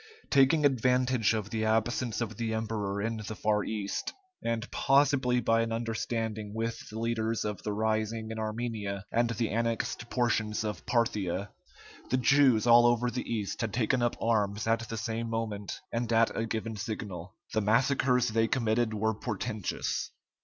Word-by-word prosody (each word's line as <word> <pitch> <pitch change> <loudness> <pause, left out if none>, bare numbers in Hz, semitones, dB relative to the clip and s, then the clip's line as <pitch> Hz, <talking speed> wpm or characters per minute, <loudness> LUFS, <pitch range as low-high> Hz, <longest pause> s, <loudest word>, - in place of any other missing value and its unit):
Taking 140 +3 +5
advantage 125 -3 +3
of 105 -2 -4
the 110 -1 -1
absence 115 +1 0
of 110 -3 -3
the 115 -1 -1
emperor 105 -3 -2
in 115 +1 -1
the 110 0 -6
far 105 0 +1
East, 105 -2 -3 0.3
and 115 0 -1
possibly 135 -3 +3
by 115 -1 +2
an 115 0 -1
understanding 115 -2 -3
with 115 +1 -3
the 110 - -7
leaders 115 -1 -1
of 105 -1 -3
the 105 - -3
rising 110 +1 -1
in 110 - -5
Armenia 110 -3 -3
and 120 0 +2
the 115 -1 -1
annexed 115 +1 -1
portions 115 -3 0
of 105 -3 -5
Parthia, 105 -5 0 0.6
the 130 - +2
Jews 130 -2 +4
all 120 0 +7
over 120 0 +2
the 125 - -4
East 105 -1 -2
had 115 -3 -2
taken 125 +1 +1
up 120 0 +1
arms 105 -2 +1
at 115 +1 0
the 115 - -4
same 115 +1 -3
moment, 110 -3 -3
and 115 0 -2
at 115 0 +3
a 115 - -1
given 110 0 -3
signal. 100 -3 -5 0.2
The 110 - +2
massacres 125 +3 +3
they 115 +1 +2
committed 115 -2 +1
were 110 +1 +1
portentous. 110 -1 -3
115 Hz, 165 wpm, -30 LUFS, 110-120 Hz, 0.6 s, all